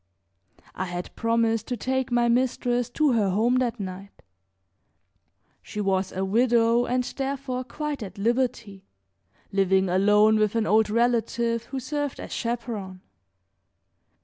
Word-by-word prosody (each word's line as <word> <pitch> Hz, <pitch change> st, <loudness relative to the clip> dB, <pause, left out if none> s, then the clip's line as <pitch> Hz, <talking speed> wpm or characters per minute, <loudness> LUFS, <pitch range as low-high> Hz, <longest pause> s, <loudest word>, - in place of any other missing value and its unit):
I 185 Hz, -, -3 dB
had 175 Hz, 0 st, -6 dB
promised 230 Hz, -1 st, +1 dB
to 245 Hz, -, -3 dB
take 260 Hz, +2 st, -2 dB
my 240 Hz, 0 st, +3 dB
mistress 245 Hz, 0 st, +1 dB
to 295 Hz, +3 st, +2 dB
her 215 Hz, -5 st, +2 dB
home 225 Hz, +6 st, +2 dB
that 245 Hz, -2 st, -1 dB
night. 195 Hz, +1 st, -8 dB, 1.4 s
She 210 Hz, -, -8 dB
was 195 Hz, -2 st, 0 dB
a 190 Hz, +1 st, -2 dB
widow 235 Hz, +2 st, +3 dB
and 250 Hz, +1 st, +1 dB
therefore 270 Hz, -1 st, -4 dB
quite 295 Hz, +2 st, -5 dB
at 205 Hz, -2 st, -8 dB
liberty, 235 Hz, -3 st, -1 dB, 0.7 s
living 190 Hz, -1 st, +2 dB
alone 210 Hz, +4 st, +4 dB
with 215 Hz, 0 st, +1 dB
an 225 Hz, -1 st, +1 dB
old 215 Hz, +1 st, +3 dB
relative 235 Hz, 0 st, 0 dB
who 270 Hz, -, -5 dB
served 290 Hz, +2 st, -3 dB
as -, -, -8 dB
chaperon. 225 Hz, -6 st, -4 dB
230 Hz, 130 wpm, -25 LUFS, 200-245 Hz, 1.4 s, alone